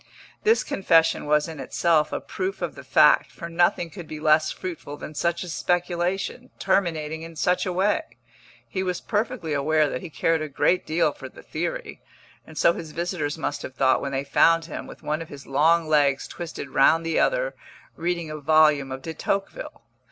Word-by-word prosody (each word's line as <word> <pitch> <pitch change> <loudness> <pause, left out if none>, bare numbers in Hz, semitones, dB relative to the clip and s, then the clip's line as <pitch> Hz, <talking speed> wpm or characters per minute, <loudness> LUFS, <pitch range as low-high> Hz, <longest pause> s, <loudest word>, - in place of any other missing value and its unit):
This 445 +1 +3
confession 165 -5 +2
was 150 +1 +3
in 160 -3 -8
itself 155 +3 +1
a - - -2
proof 380 +1 -4
of - - -2
the - - -11
fact, - - +4
for 170 - -8
nothing 170 0 +1
could 175 -3 -9
be 155 - -7
less 155 0 +3
fruitful 165 -5 -7
than 150 - -8
such 170 +3 -1
a - - -8
speculation, 175 +7 -1
terminating 160 -5 0
in 165 0 -9
such 180 +5 +1
a - - 0
way. 195 +4 +1 0.7
He 155 +11 -3
was 180 -2 -2
perfectly 210 - -2
aware 155 +2 +2
that 125 - -4
he 175 - -7
cared 165 +1 0
a 155 - -4
great 175 +6 +1
deal 160 +2 +2
for - - -10
the - - -15
theory, - - -4 0.5
and 160 - -12
so 170 - +4
his 160 -3 -8
visitors 170 -3 -2
must 145 -2 -3
have 130 - -8
thought 130 -1 +3
when 140 - -3
they 135 +1 -1
found 165 +4 +3
him, 165 - -7
with - - -12
one 155 +2 -2
of 165 - -8
his 140 -1 -10
long 160 +4 +3
legs 145 -3 +2
twisted 160 -5 -7
round 165 +5 +4
the 165 -1 +1
other, - - +1 0.4
reading 170 -1 -2
a 155 - -5
volume 150 -2 +4
of 130 0 -6
De 165 - -5
Tocqueville. 200 - -4
165 Hz, 195 wpm, -24 LUFS, 150-180 Hz, 0.7 s, fact